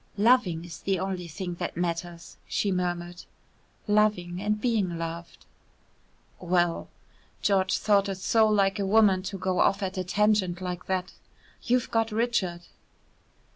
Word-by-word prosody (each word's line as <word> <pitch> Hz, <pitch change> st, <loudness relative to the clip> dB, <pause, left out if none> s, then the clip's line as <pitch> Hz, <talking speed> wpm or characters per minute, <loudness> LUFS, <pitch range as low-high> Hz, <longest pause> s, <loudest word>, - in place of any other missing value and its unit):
"Loving 205 Hz, -7 st, +3 dB
is 165 Hz, -2 st, -9 dB
the 195 Hz, -1 st, 0 dB
only 185 Hz, -1 st, -3 dB
thing 175 Hz, +2 st, -5 dB
that -, -, -4 dB
matters," 170 Hz, 0 st, -4 dB
she 200 Hz, -, 0 dB
murmured, 175 Hz, -1 st, -3 dB, 0.6 s
"loving 205 Hz, -4 st, +1 dB
and 210 Hz, +1 st, 0 dB
being 210 Hz, -8 st, 0 dB
loved." 165 Hz, +1 st, -7 dB, 0.9 s
"Well," 175 Hz, -1 st, 0 dB, 0.5 s
(George 190 Hz, -2 st, +2 dB
thought 200 Hz, -2 st, +2 dB
it 195 Hz, -, -2 dB
so 220 Hz, +4 st, +3 dB
like 200 Hz, -1 st, +2 dB
a 200 Hz, -, 0 dB
woman 200 Hz, -2 st, +4 dB
to 195 Hz, +1 st, -5 dB
go 185 Hz, 0 st, -1 dB
off 195 Hz, +1 st, +2 dB
at 190 Hz, 0 st, -3 dB
a -, -, -1 dB
tangent 200 Hz, -2 st, +1 dB
like 180 Hz, -1 st, -5 dB
that), 185 Hz, -1 st, -2 dB, 0.5 s
"you've 250 Hz, 0 st, 0 dB
got 225 Hz, -1 st, +1 dB
Richard." 210 Hz, -6 st, 0 dB
190 Hz, 140 wpm, -27 LUFS, 175-210 Hz, 0.9 s, woman